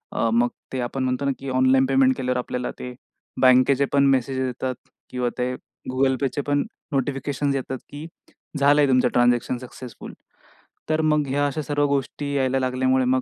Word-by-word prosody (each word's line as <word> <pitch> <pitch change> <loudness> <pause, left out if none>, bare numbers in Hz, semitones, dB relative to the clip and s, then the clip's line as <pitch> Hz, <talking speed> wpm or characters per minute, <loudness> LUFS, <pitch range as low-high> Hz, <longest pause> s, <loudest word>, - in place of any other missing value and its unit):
अ, 115 - +1
मग 120 +1 +3 0.2
ते 130 - -2
आपण 130 +2 -3
म्हणतो 130 +2 -1
ना 140 - +2
की 135 0 -6
ऑनलाईन 130 +1 +3
पेमेंट 135 -1 +3
केल्यावर 125 -1 -1
आपल्याला 125 0 -3
ते 125 0 -6 0.5
बँकेचे 130 +2 +5
पण 140 0 +4
मेसेज 130 +1 -1
येतात 130 0 -2 0.3
किंवा 125 -1 -1
ते 125 +1 -1 0.4
Google 130 0 +2
Payचे 135 +2 -1
पण 145 0 +2 0.3
नोटिफिकेशन्स 140 +1 -1
येतात 130 0 -3
की 145 +2 -8 0.5
झालंय 145 +1 +4
तुमचं 130 -1 +3
ट्रान्झॅक्शन 120 0 +2
सक्सेसफुल, 125 -1 -10 0.8
तर 155 0 +2
मग 150 -2 +2
ह्या 145 +2 +1
अशा 155 +2 -3
सर्व 145 0 0
गोष्टी 140 +1 -2
यायला 135 -1 +1
लागल्यामुळे 130 0 +1
मग 130 0 +2
130 Hz, 170 wpm, -23 LUFS, 125-140 Hz, 0.8 s, बँकेचे